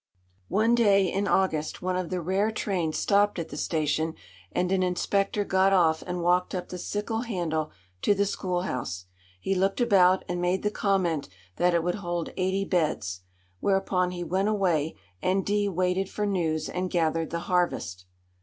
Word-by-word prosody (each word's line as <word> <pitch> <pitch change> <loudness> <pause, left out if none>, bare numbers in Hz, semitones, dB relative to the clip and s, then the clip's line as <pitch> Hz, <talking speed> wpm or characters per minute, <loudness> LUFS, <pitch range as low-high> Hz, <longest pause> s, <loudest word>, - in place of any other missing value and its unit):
One 220 +3 +2
day 200 -5 +4
in 195 +1 0
August 160 -6 0
one 185 0 0
of 180 -2 -2
the 180 -1 -2
rare 190 +5 +1
trains 185 -7 -1
stopped 205 0 +2
at 165 -2 -4
the - - -7
station, 160 +1 -1 0.4
and 180 0 0
an 190 -1 +2
inspector 195 +3 0
got 190 0 +3
off 160 -4 +3
and 180 -1 -3
walked 180 +2 +2
up 180 - -4
the 180 - -6
sickle 210 +4 -2
handle 170 -9 -2 0.3
to 205 - +3
the 200 +1 +2
schoolhouse. 175 - -3 0.3
He 195 - -1
looked 195 +3 +1
about 190 -6 +4
and 175 0 -2
made 180 +2 0
the 210 - +1
comment 180 - 0 0.3
that 175 0 +3
it 170 - +2
would 175 +1 0
hold 175 -2 -3
eighty 190 +1 0
beds. 155 - -1 0.4
Whereupon 195 - +1
he 180 -1 -5
went 190 +4 0
away, 175 -7 +1 0.3
and 190 +1 +1
D 205 0 +1
waited 185 +1 0
for 210 - -2
news 165 -6 0
and 180 0 -3
gathered 165 -2 0
the 170 0 -3
harvest. 170 - -1
180 Hz, 175 wpm, -27 LUFS, 170-195 Hz, 0.4 s, day